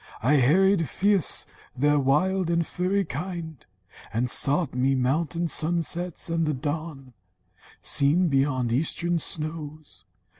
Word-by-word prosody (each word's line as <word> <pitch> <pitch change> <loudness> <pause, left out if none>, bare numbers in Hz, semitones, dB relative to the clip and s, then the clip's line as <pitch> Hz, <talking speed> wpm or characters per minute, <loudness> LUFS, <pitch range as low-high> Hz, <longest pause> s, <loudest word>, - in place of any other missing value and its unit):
I 145 +5 +3
harried 165 +4 +3
fierce 200 - +2 0.3
their 145 +2 +2
wild 170 +7 +1
and 170 -1 +1
furry 190 +4 -1
kind, 165 -3 -6 0.5
And 120 +2 -1
sought 145 +2 +2
me 130 +2 +1
mountain 160 +6 -1
sunsets, 170 +1 -1
and 165 -1 -1
the 150 - -1
dawn, 145 -1 -5 0.7
Seen 155 +6 +2
beyond 135 -4 0
eastern 165 +5 0
snows. 155 - -5
155 Hz, 115 wpm, -25 LUFS, 135-170 Hz, 0.7 s, I